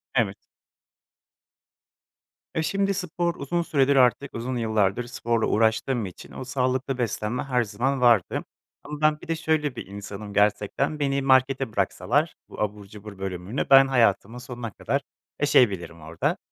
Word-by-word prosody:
Evet. 110 -6 +2 2.2
E, 160 - +1
şimdi 195 +4 0
spor 175 -2 -2
uzun 170 +5 -2
süredir 140 -4 +2
artık 130 +2 +3
uzun 125 +2 -3
yıllardır 110 -1 +1
sporla 115 -2 -1
uğraştığım 110 +2 +1
için 90 - -10
o - - -7
sağlıklı 130 +1 -1
beslenme 115 0 -2
her 125 -3 +1
zaman 130 +5 -1
vardı. 115 -7 +3 0.4
Ama 150 0 -7
ben 155 0 +3
bir - - -11
de 165 - 0
şöyle 155 -4 0
bir - - -6
insanım 100 +1 -8
gerçekten, 105 +8 +1
beni 140 -1 0
markete 130 -1 +3
bıraksalar - - 0
bu - - -8
abur 105 -1 -3
cubur 105 0 -11
bölümünü, 95 +5 -3
ben 135 0 +8
hayatımın 115 -3 +2
sonuna 120 -2 -7
kadar - - -2 0.4
yaşayabilirim 100 - +2
orada. 80 +2 -2
125 Hz, 140 wpm, -25 LUFS, 105-140 Hz, 2.2 s, ben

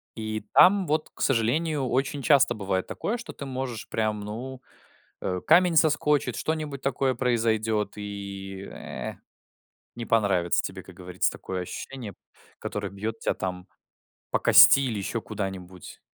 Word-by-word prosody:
И 110 -1 -4
там, 190 -1 +6
вот, 155 +1 0
к - - -12
сожалению, 135 +4 +1
очень 135 +3 -1
часто 140 -5 +4
бывает 95 -2 -2
такое, 235 +4 -3
что - - -8
ты 140 - -8
можешь 130 -4 -5
прям, 110 -1 -1
ну, 125 +5 -7 0.6
э, 90 0 -2
камень 170 +1 +5
соскочит, 150 -5 +2
что-нибудь 155 -4 -3
такое 135 0 0
произойдет 110 -4 0
и, 100 -2 -7
э, - - -7 0.8
не 120 -1 -5
понравится 100 -6 +2
тебе, - - -5
как - - -14
говорится, 90 0 -1
такое 95 -1 -5
ощущение, 110 +4 -7 0.5
которое - - -4
бьет 110 +3 -5
тя - - 0
там 90 -1 -5 0.6
по - - +2
кости - - +8
или 120 -5 -2
еще 105 +3 -3
куда-нибудь. 95 -4 -7
115 Hz, 140 wpm, -26 LUFS, 100-135 Hz, 0.8 s, кости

